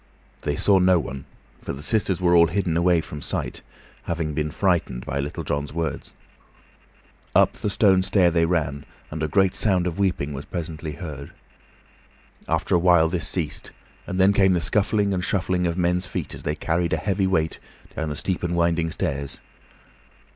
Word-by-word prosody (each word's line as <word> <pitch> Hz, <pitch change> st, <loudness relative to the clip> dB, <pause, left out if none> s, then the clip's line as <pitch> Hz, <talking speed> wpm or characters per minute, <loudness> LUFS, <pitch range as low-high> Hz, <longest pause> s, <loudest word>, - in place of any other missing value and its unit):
They 75 Hz, -, -1 dB
saw 95 Hz, +5 st, +4 dB
no 90 Hz, 0 st, +5 dB
one, 70 Hz, -4 st, -5 dB, 0.4 s
for -, -, -5 dB
the 70 Hz, +2 st, -8 dB
sisters 100 Hz, -2 st, 0 dB
were 90 Hz, -1 st, +3 dB
all 85 Hz, 0 st, +7 dB
hidden 85 Hz, -1 st, -1 dB
away 85 Hz, 0 st, +3 dB
from 75 Hz, -1 st, -8 dB
sight, -, -, -4 dB, 0.4 s
having 80 Hz, -2 st, -2 dB
been 75 Hz, 0 st, -1 dB
frightened 85 Hz, -8 st, 0 dB
by 70 Hz, -, -2 dB
Little 70 Hz, +1 st, -4 dB
John's 70 Hz, 0 st, -3 dB
words. 80 Hz, 0 st, -3 dB, 1.2 s
Up -, -, +5 dB
the -, -, -3 dB
stone 95 Hz, -2 st, +4 dB
stair 95 Hz, -2 st, +3 dB
they 85 Hz, -1 st, +3 dB
ran, 75 Hz, -5 st, -1 dB, 0.3 s
and 80 Hz, +1 st, -5 dB
a 80 Hz, -, +1 dB
great 95 Hz, +3 st, +2 dB
sound 95 Hz, -5 st, +2 dB
of 90 Hz, +1 st, -3 dB
weeping 90 Hz, -7 st, 0 dB
was 70 Hz, +2 st, -6 dB
presently 80 Hz, -2 st, -5 dB
heard. 70 Hz, -2 st, -8 dB, 1.1 s
After 80 Hz, +3 st, 0 dB
a 90 Hz, -, +5 dB
while 85 Hz, -2 st, +5 dB
this 85 Hz, 0 st, -1 dB
ceased, 80 Hz, -5 st, -3 dB, 0.4 s
and 95 Hz, -, -3 dB
then 95 Hz, +2 st, +5 dB
came 95 Hz, -2 st, +4 dB
the 90 Hz, -, +2 dB
scuffling 100 Hz, +2 st, +2 dB
and 90 Hz, -1 st, -1 dB
shuffling 90 Hz, -1 st, 0 dB
of 85 Hz, +1 st, -2 dB
men's 90 Hz, +1 st, +1 dB
feet -, -, -4 dB
as -, -, -7 dB
they 75 Hz, -, -2 dB
carried 85 Hz, +1 st, -1 dB
a -, -, +2 dB
heavy 95 Hz, +3 st, 0 dB
weight 80 Hz, -4 st, 0 dB, 0.4 s
down 80 Hz, 0 st, -2 dB
the 75 Hz, -, -4 dB
steep 90 Hz, +4 st, -2 dB
and 85 Hz, 0 st, -1 dB
winding 85 Hz, -1 st, +1 dB
stairs. 70 Hz, -3 st, -3 dB
85 Hz, 185 wpm, -24 LUFS, 80-95 Hz, 1.2 s, all